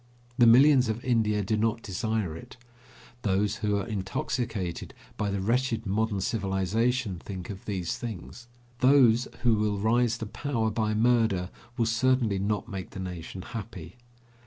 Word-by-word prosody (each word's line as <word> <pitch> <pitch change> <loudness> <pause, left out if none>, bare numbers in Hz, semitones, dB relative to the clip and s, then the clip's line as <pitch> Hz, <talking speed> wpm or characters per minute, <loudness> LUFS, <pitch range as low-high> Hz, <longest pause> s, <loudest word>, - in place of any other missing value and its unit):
The 120 - +7
millions 130 +1 +6
of 110 +2 -3
India 110 -4 +2
do 110 +3 0
not 115 +2 0
desire 105 -3 -2
it. 80 - -11 0.6
Those 100 0 0
who 105 -1 0
are 100 - -2
intoxicated 95 -2 -3 0.2
by 105 -2 -1
the 100 0 -2
wretched 115 +1 0
modern 105 0 0
civilization 100 +2 0
think 95 0 -7
of 95 - -10
these 95 -5 -2
things. 120 +1 -7 0.3
Those 125 -3 +5 0.2
who 120 -2 +4
will 105 -1 0
rise 115 +2 +2
to 115 - -5
power 115 -1 -2
by 110 0 0
murder 110 -5 +2 0.3
will 115 - +2
certainly 115 -3 +2
not 105 +3 -1
make 95 -4 -6
the - - -9
nation 90 0 -6
happy. 115 +2 -8
110 Hz, 150 wpm, -28 LUFS, 100-120 Hz, 0.6 s, The